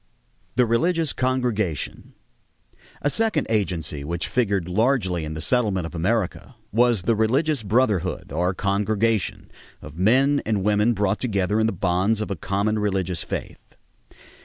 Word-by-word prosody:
=The 125 0 +4
Religious 160 +7 +1
Congregation.= 120 - -2 0.9
A 145 - +3
second 220 -7 +1
agency 85 -9 -1
which 85 +4 -2
figured 100 -8 0
largely 95 - +1
in 75 0 -5
the 80 - -4
settlement 105 -7 +1
of 80 - -7
America 100 +7 -2 0.2
was 120 -3 +3
the 115 +4 +2
religious 135 +6 +1
brotherhood, 100 - 0
or 90 +5 0
congregation, 105 +2 0 0.3
of 75 +2 -11
men 135 +8 +3
and 105 -3 -1
women 105 +3 +3
brought 100 -1 0
together 105 -3 0
in 110 - +3
the - - 0
bonds 95 +4 +1
of 110 - -3
a - - -1
common 100 +5 -1
religious 95 -4 -1
faith. - - -7
105 Hz, 140 wpm, -23 LUFS, 90-120 Hz, 0.9 s, =The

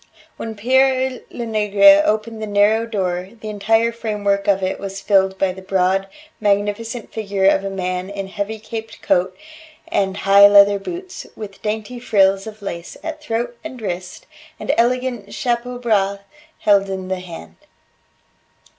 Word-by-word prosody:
When 225 -1 -6
Pere 260 +3 +2
Lenegre 205 -4 +4
opened 220 +1 -1
the 215 - -3
narrow 210 +2 +3
door, 185 -4 -2
the 215 -1 -6
entire 225 +3 +2
framework 205 -3 -1
of 195 -1 +2
it 185 - -2
was 195 0 -6
filled 190 -1 +2
by 190 -1 +1
the 190 +1 -10
broad, 190 0 +1 0.3
magnificent 210 +3 -1
figure 200 -3 -1
of 195 0 +4
a 195 - -3
man 185 -1 -3
in 200 -1 -5
heavy 205 +3 -4
caped 225 +1 -8
coat 185 +1 +1 0.5
and 190 -1 0
high 200 0 +7
leather 200 0 +6
boots, 360 - -7
with 200 -2 -9
dainty 220 +3 -4
frills 195 -3 +2
of 215 -1 -10
lace 170 -3 -6
at 315 -1 -5
throat 240 -3 -3
and 260 -6 -8
wrist, 185 -3 -5 0.3
and 280 - -1
elegant 240 -4 0
chapeau 245 0 -2
bras 200 -5 +1 0.4
held 200 -1 +3
in 190 -1 -4
the 190 0 -2
hand. 165 - -10
205 Hz, 150 wpm, -20 LUFS, 195-225 Hz, 0.5 s, high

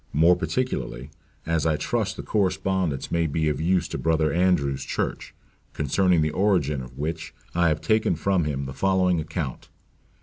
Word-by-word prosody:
more 85 +4 +5
particularly, 85 - -3 0.3
as 80 -2 0
I 80 -1 +2
trust 105 +1 -1
the - - -5
correspondence 95 -6 0
may 85 -1 +1
be 80 +1 0
of 75 0 -2
use 90 +1 +2
to - - -4
Brother 80 -2 +1
Andrew's 75 -7 +1
church; - - -3 0.4
concerning 85 +3 +2
the 75 - 0
origin 85 -9 +1
of 65 0 -11
which, 80 +2 -4 0.2
I 85 0 +3
have 75 -1 0
taken 110 -5 +2
from 90 +1 +1
him 70 -2 -2
the 65 - -6
following 90 +1 +2
account. 80 -3 -5
80 Hz, 165 wpm, -25 LUFS, 75-95 Hz, 0.4 s, more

